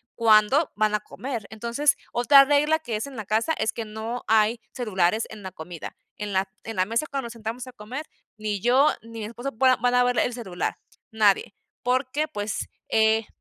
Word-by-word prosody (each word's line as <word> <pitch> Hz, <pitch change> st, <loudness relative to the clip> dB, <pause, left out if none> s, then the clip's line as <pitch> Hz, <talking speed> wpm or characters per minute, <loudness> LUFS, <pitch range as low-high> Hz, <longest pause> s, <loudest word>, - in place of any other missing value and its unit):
cuando 230 Hz, +6 st, +4 dB
van 215 Hz, 0 st, +2 dB
a -, -, +1 dB
comer. 230 Hz, +2 st, -6 dB
Entonces, 235 Hz, +6 st, +1 dB, 0.2 s
otra 275 Hz, +4 st, +7 dB
regla 295 Hz, +3 st, +3 dB
que 240 Hz, -8 st, -3 dB
es 220 Hz, -, -4 dB
en 275 Hz, -, -10 dB
la 220 Hz, -3 st, -6 dB
casa 220 Hz, +10 st, +1 dB
es 220 Hz, -, 0 dB
que 230 Hz, -, -5 dB
no 220 Hz, +3 st, -5 dB
hay 220 Hz, +1 st, +3 dB
celulares 215 Hz, -3 st, 0 dB
en 215 Hz, -2 st, -10 dB
la 190 Hz, -, -6 dB
comida, 165 Hz, -1 st, -8 dB, 0.2 s
en 210 Hz, -1 st, -4 dB
la 190 Hz, 0 st, +1 dB, 0.2 s
en 225 Hz, -, -5 dB
la 185 Hz, -, +2 dB
mesa 230 Hz, +8 st, 0 dB
cuando 270 Hz, -3 st, -3 dB
nos 235 Hz, -, -9 dB
sentamos 230 Hz, +2 st, -6 dB
a -, -, -8 dB
comer, 250 Hz, +6 st, -7 dB, 0.3 s
ni 210 Hz, -1 st, -2 dB
yo 255 Hz, +8 st, +4 dB
ni 230 Hz, 0 st, -10 dB
mi 215 Hz, -, -4 dB
esposo 240 Hz, +5 st, -5 dB
voy 260 Hz, +4 st, +4 dB
van 245 Hz, 0 st, +2 dB
a 250 Hz, -, +5 dB
ver 245 Hz, 0 st, +2 dB
el 245 Hz, -, +1 dB
celular, 190 Hz, -7 st, -3 dB, 0.4 s
nadie, 210 Hz, -2 st, +2 dB, 0.3 s
porque 255 Hz, +4 st, 0 dB
pues, 205 Hz, -5 st, -4 dB, 0.2 s
eh 220 Hz, 0 st, +3 dB
225 Hz, 200 wpm, -25 LUFS, 215-250 Hz, 0.4 s, otra